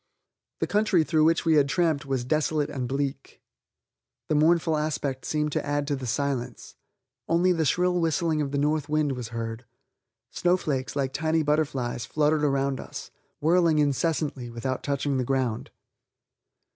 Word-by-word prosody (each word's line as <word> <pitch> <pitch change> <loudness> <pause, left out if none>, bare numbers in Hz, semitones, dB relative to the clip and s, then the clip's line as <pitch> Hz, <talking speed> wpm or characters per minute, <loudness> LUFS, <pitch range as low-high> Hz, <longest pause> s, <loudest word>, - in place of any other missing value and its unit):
The - - +3
country 205 -5 +2
through 155 -1 +2
which 165 +1 +2
we 155 -3 +5
tramped 150 -1 0
was 135 -2 -1
desolate 155 +1 0
and 125 -2 -3
bleak, 135 +1 -4 0.9
the - - +2
mournful 160 +1 +3
aspect 145 -3 -2
seemed 150 -1 -1
to - - -1
add 145 0 -1
to 145 0 -1
the 130 -2 -6
silence; 125 0 -3 0.6
only 175 +2 +3
the 165 -3 +1
shrill 180 +4 +2
whistling 160 -1 +1
of 145 - -2
the 140 - -1
north 150 +1 0
wind 155 -1 +1
was 125 -3 -4
heard. 115 0 -5 0.7
Snowflakes, 155 -8 0
like 135 -2 -1
tiny 160 +1 +1
butterflies, 140 -6 -1
fluttered 150 0 +1
around 135 -1 +1
us, - - -8 0.3
whirling 165 0 +3
incessantly 145 -3 0
without 120 +3 -3
touching 140 -1 -1
the 130 - 0
ground. 125 -3 -1
145 Hz, 150 wpm, -26 LUFS, 135-160 Hz, 0.9 s, we